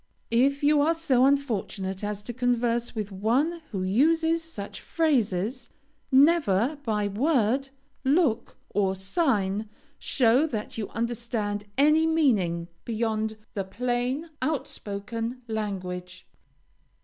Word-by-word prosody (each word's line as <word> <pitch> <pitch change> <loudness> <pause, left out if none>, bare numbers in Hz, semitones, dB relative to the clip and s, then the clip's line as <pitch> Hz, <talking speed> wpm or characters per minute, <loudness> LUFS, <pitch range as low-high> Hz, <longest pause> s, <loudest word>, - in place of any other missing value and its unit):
If 275 +5 +2
you 295 0 +5
are 325 +3 +3
so 265 -6 +3
unfortunate 210 -8 -1
as 205 0 -3
to 240 - -5
converse 240 -1 0
with 210 -2 -3
one 255 - 0
who 190 -4 -3
uses 320 - +3
such 265 -12 -7
phrases, 245 - 0 0.4
never 275 - +4
by 210 -4 0
word, 260 +3 +1 0.3
look, 270 -5 +1
or 195 -2 +1
sign 205 - 0 0.3
show 255 +4 +3
that 215 -7 -5
you 220 -3 -4
understand 230 -3 -2
any 305 +3 +5
meaning 205 - +2 0.2
beyond 220 -1 -1 0.2
the 200 - -2
plain, 250 - -2
outspoken 230 -3 -4
language. 185 -4 -4
235 Hz, 110 wpm, -26 LUFS, 205-280 Hz, 0.4 s, you